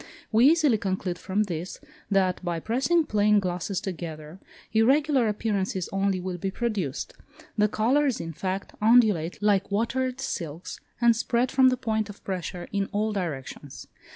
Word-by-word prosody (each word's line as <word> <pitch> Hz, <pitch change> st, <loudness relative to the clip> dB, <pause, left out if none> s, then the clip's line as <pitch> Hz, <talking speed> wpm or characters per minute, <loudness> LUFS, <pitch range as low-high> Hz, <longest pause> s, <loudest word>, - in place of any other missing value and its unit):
We 230 Hz, +4 st, +6 dB
easily 300 Hz, -8 st, +4 dB
conclude 185 Hz, -2 st, -2 dB
from 205 Hz, +2 st, 0 dB
this, 175 Hz, -2 st, -5 dB, 0.3 s
that 190 Hz, -2 st, +1 dB
by 170 Hz, -2 st, -2 dB
pressing 270 Hz, -, +1 dB
plane 210 Hz, -2 st, +3 dB
glasses 180 Hz, 0 st, -2 dB
together, 165 Hz, -2 st, -7 dB, 0.3 s
irregular 265 Hz, +3 st, +3 dB
appearances 200 Hz, -4 st, -1 dB
only 195 Hz, -1 st, +1 dB
will 180 Hz, -1 st, -4 dB
be 195 Hz, -, -2 dB
produced; 195 Hz, -, -3 dB, 0.4 s
the 210 Hz, -1 st, +3 dB
colours, 255 Hz, +6 st, +1 dB
in 165 Hz, 0 st, -5 dB
fact, 185 Hz, +4 st, -4 dB
undulate 215 Hz, -7 st, +4 dB
like 200 Hz, -2 st, +2 dB
watered 255 Hz, +5 st, -1 dB
silks, 170 Hz, -, -5 dB, 0.2 s
and 235 Hz, -1 st, +5 dB
spread 240 Hz, +2 st, 0 dB
from 260 Hz, -1 st, +5 dB
the 255 Hz, -, 0 dB
point 220 Hz, -2 st, -1 dB
of 205 Hz, -, -11 dB
pressure 180 Hz, -2 st, -4 dB
in 200 Hz, -1 st, -1 dB
all 215 Hz, +1 st, 0 dB
directions. 145 Hz, -6 st, -5 dB
205 Hz, 150 wpm, -26 LUFS, 180-230 Hz, 0.4 s, We